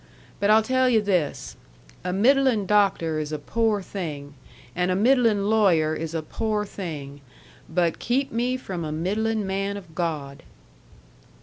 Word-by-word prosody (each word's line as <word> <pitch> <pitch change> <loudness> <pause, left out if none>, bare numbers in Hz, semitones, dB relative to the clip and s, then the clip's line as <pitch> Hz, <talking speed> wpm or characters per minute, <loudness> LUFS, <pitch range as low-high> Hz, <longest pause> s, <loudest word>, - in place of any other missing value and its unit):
But 200 - +1
I'll 220 +1 +6
tell 255 +2 +2
yu' 230 -3 +4
this: 185 -8 -1 0.5
a 180 - -2
middlin' 245 +1 +3
doctor 190 -6 +2
is 150 0 -4
a 155 - -2
pore 215 +5 0
thing, 150 -8 -6 0.4
and 180 +1 0
a 185 - +1
middlin' 225 -2 +3
lawyer 185 -8 +3
is 160 +1 -4
a 160 - -2
pore 210 +5 -2
thing; 145 -8 -7 0.5
but 170 -1 0
keep 265 +3 0
me 245 +3 0
from 185 -9 -5
a 155 - -4
middlin' 210 +7 -1
man 195 +1 -2
of 180 -5 -12
God." 150 -5 -3
195 Hz, 150 wpm, -24 LUFS, 160-220 Hz, 0.5 s, I'll